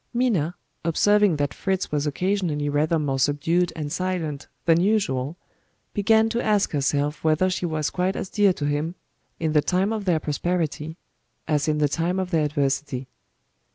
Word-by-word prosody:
Minna, 195 - +1 0.3
observing 205 +3 +3
that 145 -1 -1
Fritz 190 -1 -2
was 150 0 0
occasionally 165 -3 -1
rather 155 +3 +1
more 140 -3 -1
subdued 165 +6 +1
and 150 -2 -4
silent 175 -5 -3 0.2
than 165 0 +4
usual, 170 -8 0 0.6
began 220 +1 +4
to 235 +1 -1
ask 210 -2 +2
herself 145 +1 0
whether 160 +4 +2
she 180 -1 -1
was 155 -2 -1
quite 185 +1 0
as - - -3
dear 205 0 +3
to 145 - -4
him, 150 +4 -1 0.4
in 160 -2 0
the 150 - +5
time 190 +6 +1
of 215 -2 -4
their 170 -4 +2
prosperity, 160 0 -2 0.5
as 150 0 +1
in 155 -1 +1
the 150 -1 +3
time 170 +5 -1
of 185 -1 -2
their 160 -3 +2
adversity. 140 -3 -1
160 Hz, 165 wpm, -24 LUFS, 145-185 Hz, 0.6 s, the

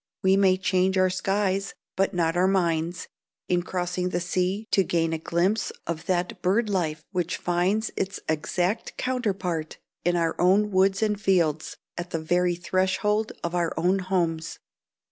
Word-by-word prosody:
We 190 0 +5
may 190 -1 +4
change 190 0 +1
our 185 0 +3
skies, 195 +1 0 0.2
but 195 +1 +1
not 170 -3 0
our 180 +1 +3
minds, 170 -2 0 0.4
in 180 -1 +2
crossing 180 0 -2
the 175 - -1
sea 185 +4 -1
to 195 - +4
gain 165 -2 0
a 160 - -2
glimpse 180 +6 0
of 165 -1 -4
that 180 -1 -1
bird 210 +5 +2
life 160 -5 -1
which 180 -3 -1
finds 185 +5 0
its 195 +1 -2
exact 175 +6 -1
counterpart 195 -10 -2 0.3
in 175 +1 +2
our 165 -1 +1
own 200 +4 +4
woods 195 +2 +3
and 210 -1 0
fields, 165 -6 +1 0.2
at 175 +1 -5
the 165 - -2
very 175 +2 +1
threshold 190 +4 0
of 170 - -2
our 175 -2 0
own 180 +4 +2
homes. 170 -4 -1
180 Hz, 160 wpm, -26 LUFS, 170-195 Hz, 0.4 s, We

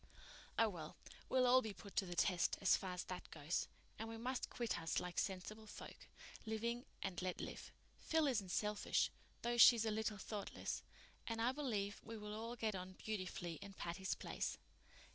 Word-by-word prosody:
"Oh, 225 - +6
well, 165 -7 -5 0.3
we'll 255 -1 +5
all 255 +1 +7
be 220 -4 -4
put 190 +3 -11
to 195 - +3
the 175 - -4
test, 180 -1 +3
as 195 - +6
far 185 -1 -2
as 180 - -2
that 185 - -6
goes. 155 +2 -1 0.3
And 225 +1 -3
we 225 - -5
must 250 +3 -1
quit 235 -2 -1
us 165 - +1
like 180 -1 -2
sensible 210 +3 -2
folk, - - -9 0.4
living 235 +2 -1 0.2
and 190 -2 -2
let 180 0 -1
live. - - -5 0.3
Phil 320 -1 +3
isn't 220 -9 +1
selfish, 210 +3 +2 0.3
though 240 0 +1
she's 230 -1 +10
a 220 - +2
little 215 0 0
thoughtless, 205 0 -3 0.5
and 230 -1 -1
I 235 +2 +4
believe 220 -8 -1
we 225 0 -6
will 210 0 -5
all 230 +2 -3
get 220 -2 0
on 185 0 -5
beautifully 185 -5 -3
in 200 - -7
Patty's 190 +1 -2
Place." - - -2
210 Hz, 180 wpm, -41 LUFS, 185-230 Hz, 0.5 s, she's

